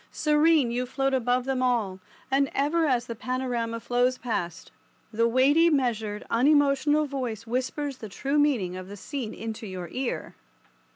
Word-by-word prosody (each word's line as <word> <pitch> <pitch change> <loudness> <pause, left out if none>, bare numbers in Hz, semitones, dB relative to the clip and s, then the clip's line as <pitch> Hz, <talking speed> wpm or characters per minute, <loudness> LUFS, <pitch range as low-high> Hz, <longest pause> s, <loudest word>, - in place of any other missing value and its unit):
Serene 300 -4 +3
you 250 +1 -2
float 270 +1 -1
above 250 0 +1
them 265 -1 -1
all, 225 -7 0 0.3
and 275 0 +3
ever 315 +3 +2
as 250 -4 +1
the 235 - -5
panorama 240 -1 -2
flows 245 +2 +1
past, 175 -9 -4 0.4
the 230 +2 +3
weighty 280 +8 +4
measured 220 -8 -1
unemotional 290 +3 +3
voice 250 -6 -4
whispers 260 +4 -2
the 220 - -8
true 275 +9 -1
meaning 235 -12 +1
of 185 0 -7
the 205 +1 -9
scene 250 0 -5
into 220 -1 -6
your 180 -3 -6
ear. 255 -1 -3
250 Hz, 155 wpm, -26 LUFS, 225-275 Hz, 0.4 s, weighty